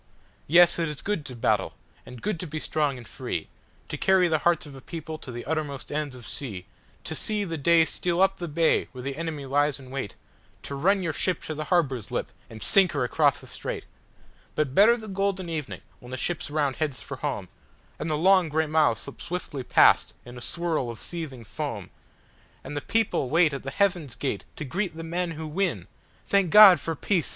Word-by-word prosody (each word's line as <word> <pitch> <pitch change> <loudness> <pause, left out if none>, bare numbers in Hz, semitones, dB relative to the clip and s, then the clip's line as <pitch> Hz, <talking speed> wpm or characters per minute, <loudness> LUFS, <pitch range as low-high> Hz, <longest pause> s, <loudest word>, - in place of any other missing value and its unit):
Yes, 170 +3 +6
it 165 -2 0
is 150 - -7
good 200 -7 -2
to 130 - -7
battle, 110 -4 +1 0.3
and 125 -1 -11
good 205 -5 -1
to 180 - -5
be 155 +1 -4
strong 150 -3 0
and 120 -2 -11
free, - - -4 0.4
To - - -3
carry 190 -2 +4
the 160 -2 +1
hearts 170 -1 +2
of 145 - -11
a 135 - -11
people 160 +1 -7
to 130 - -8
the 120 0 -7
uttermost 145 -4 -3
ends 150 -3 -2
of 125 - -11
sea, 105 -11 -6 0.4
To - - -4
see 210 -1 -1
the 165 -4 -3
day 165 +3 +5
steal 175 +1 -1
up 195 0 +4
the 175 - -4
bay 160 +1 +2
where 125 -1 -8
the 135 +1 -3
enemy 155 -3 -4
lies 145 +1 +1
in 130 -2 -13
wait, 135 -7 -4 0.5
To - - -5
run 190 +8 +2
your 165 -3 -1
ship 185 +4 0
to 155 - -4
the 155 0 -4
harbor's 140 - +1
lip - - -3 0.2
and 110 -1 -8
sink 190 -3 +4
her 140 -3 0
across 125 - +2
the - - -12
strait:—But 130 - -6
better 220 +8 +6
the 220 -2 -9
golden 195 -2 -1
evening 155 -4 -4 0.2
when 125 - -13
the 130 - -4
ships 165 +2 -2
round 145 -3 0
heads 150 -5 -2
for - - -7
home, - - -3 0.5
And 155 - -3
the 155 - 0
long 185 0 +4
gray 160 +1 +1
miles 155 -6 +3
slip 140 - -8
swiftly 170 -6 -4
past - - +4
in 120 0 -10
a 120 - -9
swirl 165 -4 -2
of 115 - -7
seething 155 -8 -5
foam, 115 - -5 0.7
And 145 - -7
the 145 - -2
people 220 - 0
wait 160 0 +4
at 140 - -4
the 135 - -5
haven's 175 - 0
gate 130 -8 -3
to 155 - -5
greet 175 +4 -3
the 165 - -5
men 170 +1 -2
who 160 0 -6
win! 155 - -1 0.4
Thank 195 -3 +2
God 200 -3 +9
for 165 +3 -3
peace! 170 0 0
155 Hz, 215 wpm, -26 LUFS, 135-175 Hz, 0.7 s, God